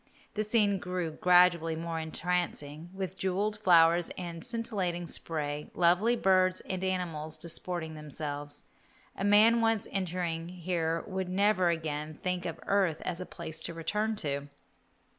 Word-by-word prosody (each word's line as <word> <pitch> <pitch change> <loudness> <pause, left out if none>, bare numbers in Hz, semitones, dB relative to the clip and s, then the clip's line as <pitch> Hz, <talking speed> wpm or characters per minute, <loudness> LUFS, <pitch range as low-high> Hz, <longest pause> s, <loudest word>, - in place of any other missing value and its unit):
The 215 - -1
scene 210 -2 +2
grew 180 -2 -3
gradually 175 -1 +4
more 165 0 -3
entrancing, 160 -1 -2
with 190 -1 -5
jewelled 200 +3 0
flowers 170 -3 +5
and 170 -2 -5
scintillating 205 -8 -2
spray, 150 -3 -2
lovely 180 +7 +4
birds 185 -3 +3
and 185 -1 -4
animals 165 -5 -2
disporting 170 -1 -3
themselves. 145 -1 -5 0.5
A - - -4
man 215 +3 +6
once 225 -2 +2
entering 175 -3 -2
here 170 -2 -1
would 190 -1 -3
never 185 -1 +3
again 155 -2 -3
think 180 +2 -2
of 165 - -5
earth 190 -6 +2
as 180 0 -3
a 185 - -6
place 160 0 -6
to 170 - -4
return 210 +7 -1
to. 140 0 -2
180 Hz, 140 wpm, -30 LUFS, 160-190 Hz, 0.5 s, man